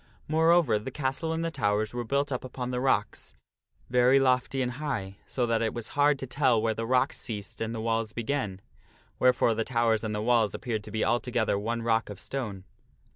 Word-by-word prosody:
Moreover 160 -6 +4
the 105 - -6
castle 135 +4 -2
and 165 +1 -1
the 165 - -2
towers 110 -5 0
were 120 0 -2
built 140 +4 0
up 125 - -2
upon 125 -1 -5
the 125 - -1
rocks, 130 0 -1 0.5
very 125 +2 +4
lofty 130 0 +2
and 125 - -2
high, 115 -9 -4
so 125 - 0
that 115 -1 +1
it 115 0 -1
was 120 -2 -4
hard 145 0 +3
to 135 - -5
tell 130 -3 +2
where 110 0 +1
the 115 +1 -4
rocks 125 0 +2
ceased 105 -2 -6
and 115 0 -1
the - - -4
walls 115 -1 -1
began, 110 -4 -3 0.6
wherefore 125 -2 +4
the 115 +1 -1
towers 115 -2 +1
and 110 -1 -2
the - - -2
walls 115 -4 +2
appeared 110 -4 -3
to 105 - -9
be 110 0 0
altogether 120 -3 +1
one 115 +2 -2
rock 115 -1 +1
of 100 - -8
stone. 110 -9 -5
120 Hz, 205 wpm, -28 LUFS, 110-130 Hz, 0.6 s, Moreover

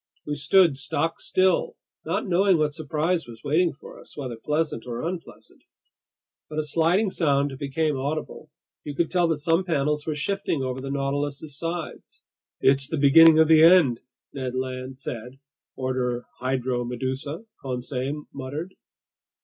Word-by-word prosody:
We 150 - -3
stood 150 +1 +4
stock 155 +3 -1
still, 315 - +1 0.3
not - - -1
knowing 185 0 +3
what 150 -1 0
surprise 160 +2 -1
was 115 -1 -12
waiting 160 +4 +2
for 140 - -13
us, - - -15
whether 130 -5 -4
pleasant 150 -1 -2
or 120 0 -4
unpleasant. 175 -1 -8 0.9
But 155 - -7
a 155 - +1
sliding 170 +7 +2
sound 140 -5 +1
became 150 +2 -1
audible. 155 +2 -4 0.3
You 145 -1 -6
could 170 - 0
tell 175 -2 +3
that 165 -2 0
some 165 +4 +1
panels 150 -3 -1
were 155 - -1
shifting 160 -2 -1
over 130 0 -3
the 135 - -5
Nautilus's 140 +1 -2
sides. 165 0 -5 0.4
"It's 135 0 +3
the 160 - -3
beginning 155 +3 +7
of 160 0 +6
the 160 0 +6
end!" 165 -8 +6 0.3
Ned 130 -2 -4
Land 130 0 -4
said. 125 -1 -7 0.2
"... - - -69
order 125 -2 -2 0.2
Hydromedusa," 130 - -2 0.2
Conseil 130 +3 -4
muttered. 145 +7 -6
145 Hz, 150 wpm, -25 LUFS, 130-165 Hz, 0.9 s, beginning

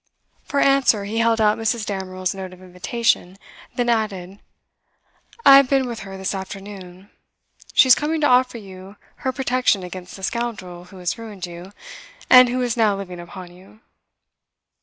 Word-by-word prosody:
For 285 - -2
answer 275 -8 +3
he 220 +3 -3
held 230 0 +2
out 215 0 +2
Mrs. 225 -1 -1
Damerel's 185 -2 -3
note 190 -1 -8
of 185 - -16
invitation, 185 +1 -1 0.4
then 245 -1 -1
added: 200 -5 -2 1.1
'I 275 - +10
have 275 -2 +4
been 270 -1 +2
with 235 -2 -5
her 195 -1 -9
this 190 +1 -3
afternoon. 195 -1 -9 0.6
She - - +6
is 255 - +9
coming 310 +4 0
to 295 - +4
offer 250 -1 +3
you 190 -1 -12 0.2
her 260 - -2
protection 255 -6 0
against 180 0 -9
the 195 - -12
scoundrel 190 -6 -4
who 190 +1 -15
has 180 +5 -3
ruined 210 -5 -7
you, 175 +2 -10 0.6
and 255 -1 +9
who 250 +1 -1
is 240 -2 -1
now 220 -4 +2
living 180 -3 -8
upon 175 +1 -10
you. 195 +4 -19
205 Hz, 165 wpm, -21 LUFS, 185-240 Hz, 1.1 s, I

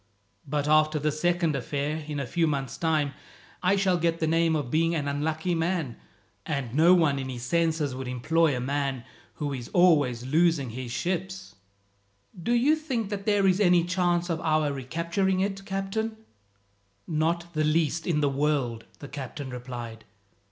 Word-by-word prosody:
But 145 +1 -1
after 155 0 +4
this 150 +1 -1
second 175 -2 +1
affair, 145 +2 -2
in 150 -2 -3
a 140 - -2
few 165 +6 +1
months' 135 -3 -2
time, 155 -4 0 0.5
I 185 +2 +3
shall 190 -3 +2
get 165 0 0
the 160 - +1
name 165 0 +2
of 140 -6 -3
being 165 +2 +2
an 145 -3 -2
unlucky 155 +4 -1
man, 165 -6 -1 0.5
and 140 -4 -3
no 165 +5 +6
one 150 -6 +2
in 130 -1 -4
his 120 -2 -6
senses 160 -1 0
would 130 0 -5
employ 145 +4 +1
a - - -2
man 135 -1 -2 0.3
who 145 -2 -3
is 125 -3 -6
always 145 -9 +4
losing 155 -2 +2
his 125 0 -6
ships." 185 +5 -3 0.9
"Do 235 +8 0
you 260 +6 +4
think 255 -9 -3
that 200 0 -4
there 205 -2 +3
is 190 0 +3
any 180 -4 +4
chance 175 -1 +1
of 165 -2 -2
our 155 -2 +1
recapturing 170 +8 -1
it, 195 0 -2
captain?" 210 +3 -3 0.9
"Not 170 +2 -1
the 155 -1 +1
least 160 +1 +1
in 155 -4 +1
the 145 - +3
world," 135 -5 0
the 145 - -9
captain 140 0 -7
replied. 120 -3 -7
155 Hz, 170 wpm, -27 LUFS, 140-175 Hz, 0.9 s, no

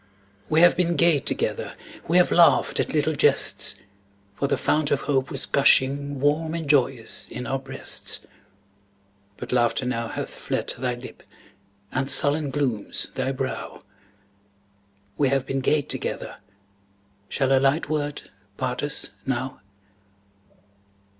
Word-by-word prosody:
We 155 - +4
have 175 0 +7
been 175 -1 +1
gay 170 -4 +4
together; - - -2 0.3
We 170 - +3
have 180 - +4
laughed 170 -1 +4
at - - 0
little 155 +1 +1
jests; 145 - +2 0.6
For 140 - -1
the - - 0
fount 150 -1 +1
of 140 - +1
hope 135 -2 0
was 135 - -3
gushing 140 +1 +3
Warm 155 +3 +1
and 165 -3 -4
joyous 130 -5 +1
in 125 - -6
our 135 +2 -2
breasts, 135 0 -2 1.1
But - - -7
laughter 120 0 +1
now 115 -2 -2
hath - - -5
fled - - -2
thy - - -2
lip, - - -11 0.7
And 135 +1 -1
sullen 145 +2 +2
glooms 130 -7 -2
thy 135 - -1
brow; 130 -1 -5 1.4
We 140 -2 +3
have 135 -1 0
been 135 0 -2
gay 150 +2 +2
together, - - -2 0.9
Shall 135 0 +2
a - - +4
light 135 +4 +2
word 145 -1 -2 0.3
part 125 0 -2
us 145 0 -3 0.2
now? 130 -2 -3
140 Hz, 135 wpm, -24 LUFS, 130-150 Hz, 1.4 s, have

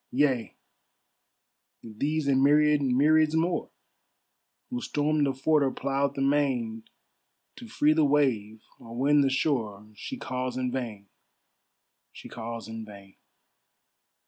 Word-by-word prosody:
Yea, 130 -3 0 1.3
these 140 +7 -2
and 135 -1 +3
myriad 150 +1 +4
myriads 150 +4 +3
more, 170 +2 0 1.0
Who 245 0 -3
stormed 150 -4 0
the 135 - 0
fort 150 +3 +2
or 135 - +2
ploughed 140 +1 -2
the 135 - -1
main, 130 -6 0 0.7
To - - -10
free 150 +1 +2
the 155 0 +2
wave 125 -7 +1 0.2
or 115 0 -11
win 145 +3 +4
the 135 - +2
shore, 115 -7 -1
She 265 - -7
calls 130 - -4
in 125 -1 -2
vain, 115 -6 -5 1.0
she - - -12
calls 115 0 -7
in 110 0 -7
vain. 100 -2 -14
135 Hz, 125 wpm, -27 LUFS, 115-150 Hz, 1.3 s, myriad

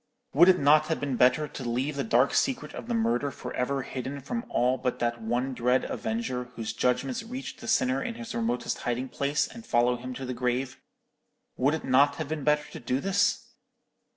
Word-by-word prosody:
Would 175 +6 +7
it 185 - +6
not 150 +2 +5
have 160 - -1
been 140 -3 -2
better 130 +5 +4
to 135 - -8
leave 125 +5 -1
the 140 - -1
dark 120 +4 +3
secret 260 -3 0
of - - -7
the 240 - -1
murder 225 -10 +1
for - - -7
ever 135 +2 -1
hidden 130 +3 -5
from 230 - -4
all 125 +2 +1
but 125 - -1
that 120 -1 -1
one 120 +4 -1
dread 125 +1 +2
Avenger 220 - -3
whose 110 -1 -4
judgments 125 - 0
reach 250 +4 -7
the - - -10
sinner 130 - +2
in 230 - -4
his 235 -1 -7
remotest 235 +1 -1
hiding 125 +2 -2
place, 140 +3 0
and 230 0 -11
follow 120 - +2
him 125 +1 -7
to 135 - -5
the 125 - -3
grave? 125 +2 -2 0.7
Would 140 +4 +2
it 160 - -6
not 140 +2 +4
have 155 -1 -5
been 155 -2 -3
better 150 0 +2
to - - -8
do 125 +2 -1
this? 195 +5 +1
135 Hz, 210 wpm, -28 LUFS, 125-160 Hz, 0.7 s, Would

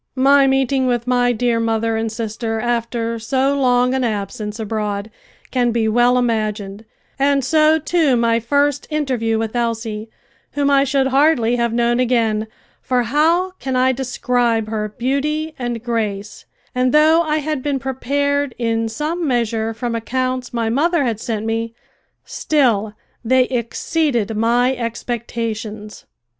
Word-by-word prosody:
My 275 +1 +5
meeting 265 0 +1
with 240 -1 0
my 245 -1 +2
dear 235 0 0
mother 225 0 0
and 225 0 -2
sister 225 0 -3
after 230 0 -2
so 265 +4 0
long 250 -2 +2
an 265 -1 0
absence 210 0 -3
abroad 210 -1 -3 0.4
can 245 -2 +1
be 230 -1 0
well 240 +3 +3
imagined, 215 -3 -2 0.3
and 275 -1 +2
so 310 +2 +4
too 315 -3 +2
my 230 0 +2
first 285 +4 0
interview 255 -7 -1
with 225 +1 -3
Elsie, 225 -2 -2 0.4
whom 285 -1 +1
I 275 0 +4
should 270 0 +1
hardly 270 -4 +3
have 235 -1 0
known 240 +1 +1
again, 225 -3 +1 0.3
for 250 -1 0
how 325 +9 +2
can 265 -1 -3
I 255 +1 +3
describe 245 -3 0
her 215 -1 -2
beauty 290 +7 -2
and 240 -2 -3
grace, 215 -4 -3 0.3
and 255 0 +1
though 315 +2 +5
I 310 -2 0
had 305 -2 -2
been 285 0 -1
prepared 280 +1 -1
in 225 -1 -1
some 310 +8 -2
measure 230 -3 0
from 230 +1 -4
accounts 255 +2 -2
my 230 -2 -1
mother 295 +7 +1
had 230 -4 -1
sent 220 -2 -3
me, 225 +1 -2 0.5
still 225 -8 0 0.3
they 255 +2 +4
exceeded 240 -1 -1
my 240 +4 +2
expectations. 230 -2 -5
240 Hz, 145 wpm, -19 LUFS, 225-270 Hz, 0.5 s, My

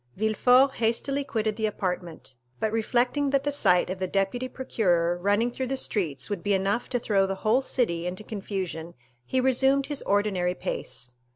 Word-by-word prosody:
Villefort 250 +6 +3
hastily 235 +5 0
quitted 220 -5 -2
the 220 -1 +1
apartment, 180 -8 -4 0.2
but 220 - 0
reflecting 245 +5 +1
that 275 0 +1
the 290 - 0
sight 180 -10 +3
of 185 - -5
the 185 - -1
deputy 195 +7 -1
procureur 180 -10 0
running 205 +6 +1
through 260 +1 -3
the 270 +1 -2
streets 175 - -1
would 205 -4 -3
be 205 +1 +1
enough 195 +5 -1
to 250 - 0
throw 200 -4 +1
the 195 - -2
whole 230 +5 +4
city 180 -11 -1
into 185 +4 -5
confusion, 190 -6 -5 0.3
he 260 - +1
resumed 265 +2 +3
his 290 0 -2
ordinary 195 -3 0
pace. 125 -7 -6
215 Hz, 175 wpm, -26 LUFS, 185-255 Hz, 0.3 s, whole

